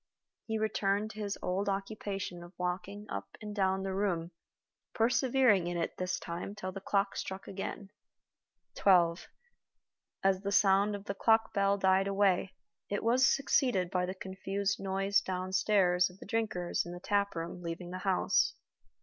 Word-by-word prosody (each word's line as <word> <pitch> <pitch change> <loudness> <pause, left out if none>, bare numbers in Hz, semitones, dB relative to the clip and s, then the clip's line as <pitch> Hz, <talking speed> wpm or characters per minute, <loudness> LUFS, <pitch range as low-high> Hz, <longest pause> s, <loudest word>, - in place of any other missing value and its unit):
He 220 -1 -1
returned 215 -1 0
to 215 - -10
his 205 -1 -3
old 195 +3 0
occupation 195 -2 -4
of 175 +2 -13
walking 180 +3 -3
up 100 0 -6
and 210 -1 -7
down 190 -1 +1
the 195 0 -2
room, 180 -4 -1 0.6
persevering 240 -4 +3
in 175 0 -2
it 165 - -2
this 185 0 -1
time 175 +4 -5
till 185 -3 -5
the 195 - -7
clock 195 0 0
struck 190 0 -5
again. 195 +1 -6 0.8
Twelve. 175 -3 +3 1.0
As 190 -1 +3
the 200 0 -2
sound 200 0 +4
of 200 0 -8
the 200 - -3
clock 225 +2 +3
bell 200 0 +2
died 190 0 +3
away, 195 -1 +2 0.3
it 205 - -2
was 250 +4 +4
succeeded 250 - +2
by 180 -2 0
the 185 - -4
confused 195 +1 -2
noise 195 +1 +1
downstairs 185 -1 +2
of 180 - -16
the - - -11
drinkers 210 -5 -1
in 175 - -8
the 175 - -7
taproom 180 -4 -1
leaving 175 +1 -5
the 185 - -5
house. 190 -1 +2
195 Hz, 160 wpm, -32 LUFS, 185-205 Hz, 1.0 s, sound